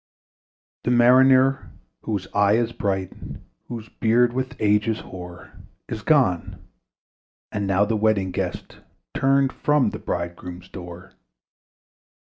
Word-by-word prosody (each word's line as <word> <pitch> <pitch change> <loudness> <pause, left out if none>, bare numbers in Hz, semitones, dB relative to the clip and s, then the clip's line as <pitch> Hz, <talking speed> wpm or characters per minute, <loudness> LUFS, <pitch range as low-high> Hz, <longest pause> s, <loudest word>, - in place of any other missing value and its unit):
The - - -1
Mariner, 130 +2 +4 0.3
whose 100 -4 -3
eye 100 0 +3
is 115 +1 +1
bright, 95 -4 -2 0.5
Whose 115 -2 -7
beard 120 +2 +2
with 130 0 -3
age 105 0 +2
is 110 -1 -1
hoar, 90 -2 -10 0.4
Is 110 - -5
gone: 125 - +1 0.9
and 100 -1 -2
now 95 +1 +3
the 110 +2 -1
Wedding 105 -3 +1
Guest - - -5 0.3
Turned 135 0 +2
from 150 -2 +1
the - - -7
bridegroom's 85 +1 -5
door. 90 0 -10
110 Hz, 120 wpm, -23 LUFS, 95-125 Hz, 0.9 s, Mariner